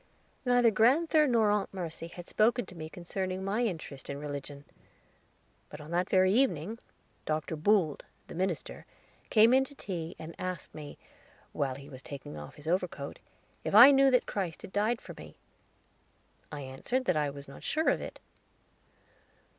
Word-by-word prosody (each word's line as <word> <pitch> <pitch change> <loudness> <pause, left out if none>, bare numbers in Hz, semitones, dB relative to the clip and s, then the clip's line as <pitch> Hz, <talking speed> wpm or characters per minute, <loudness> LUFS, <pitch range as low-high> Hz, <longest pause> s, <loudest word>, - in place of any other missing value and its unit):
Neither 245 -2 +5
grand'ther 300 - +4
nor 225 -4 +3
Aunt 205 -1 0
Mercy 170 -3 -5
had 175 +1 -10
spoken 235 +5 +2
to - - -13
me 160 -2 -7
concerning 185 +3 -4
my 200 +4 0
interest 160 - -4
in 140 - -3
Religion; 145 0 -6 1.0
but 150 - -9
on 150 +2 -10
that 175 +2 0
very 185 0 +4
evening 225 - +1 0.5
Mr. 155 +1 -1
Boold, 170 -2 +2 0.2
the - - -10
minister, 180 -1 -3 0.4
came 225 +2 +6
in 265 +1 +5
to 285 - -14
tea 175 -7 -5
and 160 +1 -8
asked 185 -2 -5
me, 150 -1 -9 0.6
while 135 -2 -1
he 140 +1 -11
was 130 -3 -10
taking 135 - -8
off 75 -1 -9
his 150 +1 -12
overcoat, 170 -5 -2 0.4
if - - -1
I 245 +6 +11
knew 275 0 +6
that 250 -2 +3
Christ 180 -5 -4
had - - -10
died 220 +3 +1
for - - -9
me? - - -12 1.1
I 145 -1 -5
answered 135 - -3
that 180 - +2
I 150 -1 +1
was 140 0 -9
not 140 - -11
sure 315 +1 +1
of - - +1
it. - - -7
180 Hz, 170 wpm, -30 LUFS, 150-225 Hz, 1.1 s, I